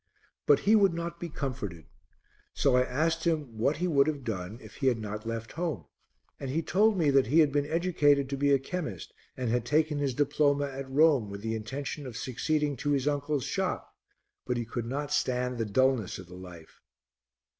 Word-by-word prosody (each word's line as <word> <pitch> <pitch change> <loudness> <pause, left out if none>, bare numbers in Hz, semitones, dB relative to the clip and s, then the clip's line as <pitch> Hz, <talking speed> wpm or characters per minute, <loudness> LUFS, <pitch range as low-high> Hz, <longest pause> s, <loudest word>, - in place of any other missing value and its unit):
But - - +5
he 215 +2 +4
would 195 -5 +4
not 170 0 -4
be 170 - -5
comforted; 105 - -5 0.7
so 135 -3 +3
I 125 - +5
asked 160 +6 0
him 150 -9 -1
what 140 +6 +2
he 180 +3 0
would 140 -4 +4
have 145 -3 -2
done 105 -2 -4
if - - -13
he 135 - 0
had 125 -3 +3
not 105 0 -6
left 115 -1 -4
home, 160 - -3 0.5
and 135 - -5
he 160 +5 -1
told 210 +4 +3
me 155 -5 +3
that 135 -3 +4
he 145 +7 +2
had 155 -3 +6
been 145 0 0
educated 150 -4 +2
to 140 - -2
be 140 +1 +2
a 140 - +6
chemist 135 - -5 0.2
and 125 -3 -1
had 120 -1 +1
taken 150 +3 +1
his 140 -3 -1
diploma 145 0 +2
at 135 -1 -6
Rome 140 -6 +4
with 100 0 -7
the 110 0 -1
intention 135 +6 -5
of 120 -2 -7
succeeding 145 +4 -1
to 145 - -2
his 140 -1 +1
uncle's 145 -1 0
shop, - - -3 0.5
but 125 -1 0
he 120 - -2
could 115 0 -4
not 145 +3 -3
stand 125 -3 0
the 115 - 0
dulness 125 0 +1
of 95 - -9
the 90 - -14
life. 90 -3 -12
140 Hz, 205 wpm, -29 LUFS, 120-150 Hz, 0.7 s, had